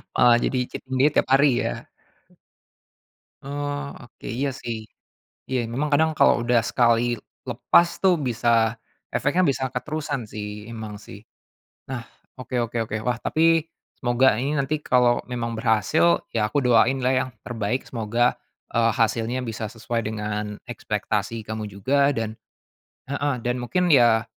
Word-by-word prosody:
Oh, 120 -1 +6
jadi 130 - 0
cheating 130 0 -6
day 150 - +6
tiap - - +1
hari 140 +2 +6 0.2
ya. - - -4 1.6
Oh, 145 0 -4
oke, 120 - -17
iya 135 +2 -2
sih. 110 -2 -6 0.6
Iya 120 -3 -2
memang 135 +6 -1
kadang 160 +2 +4
kalau 120 - +5
udah 120 -1 +2
sekali 120 0 +3 0.3
lepas 170 0 +3
tuh 185 -3 +4
bisa 115 -3 +2 0.4
efeknya 175 +5 +2
bisa 130 -2 0
keterusan 145 -1 -3
sih, 105 0 -7
memang 110 -2 -7
sih. 105 -1 -12 0.6
Nah, 130 -2 -5 0.3
oke 130 -1 -5
oke 115 +1 -6
oke, 105 - -2
wah 125 -1 0
tapi 165 +1 +3 0.4
semoga 125 +1 +4
ini 145 +2 -1
nanti 150 +2 -1
kalau 125 -3 +3
memang 115 -1 -3
berhasil 115 +9 +2
ya 105 -2 +1
aku 140 0 0
doain 125 +2 +4
lah 130 0 +1
yang 130 0 0 0.2
terbaik 115 +1 -2
semoga, 120 +1 +1 0.4
eee, 115 0 +3
hasilnya 115 +2 0
bisa 110 -1 -4
sesuai 115 +1 -3
dengan 105 -1 -4
ekspektasi 105 -1 -3
kamu 110 -1 -5
juga 135 +8 +2
dan 115 -5 -2 0.7
heeh, 140 0 -1
dan 125 0 -1
mungkin 175 +7 +1
ya 120 -3 +5
120 Hz, 145 wpm, -24 LUFS, 110-135 Hz, 1.6 s, Oh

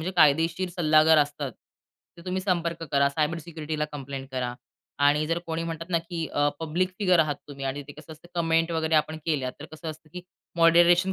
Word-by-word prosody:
म्हणजे 185 +4 -3
कायदेशीर 165 +4 +3
सल्लागार 155 -1 +5
असतात. 145 -2 -1 0.7
तर - - -11
तुम्ही 185 +1 -1
संपर्क 170 -3 -1
करा. 140 0 +4
सायबर 155 +3 0
सिक्युरिटीला 155 -2 -4
कंप्लेंट 135 -1 -6
करा. 125 -1 -2 0.4
आणि 145 +2 +3
जर 165 +1 0
कोणी 165 0 -2
म्हणतात 165 0 -5
ना 170 - +3
की 165 -1 -5
अ, 145 0 +1
पब्लिक 170 +4 0
फिगर 185 -4 +3
आहात 150 -2 0
तुम्ही 140 -1 -7
आणि 140 +2 -3
ते 145 - -8
कसं 155 +1 -12
असतं 160 +3 -16
कमेंट 165 0 +1
वगैरे 160 0 0
आपण 155 +1 +1
केल्या, 135 -5 0
तर - - -7
कसं 160 +1 -7
असतं, 155 0 -13
की 180 - -7 0.3
मॉडरेशन 175 +3 +5
160 Hz, 195 wpm, -26 LUFS, 145-170 Hz, 0.7 s, सल्लागार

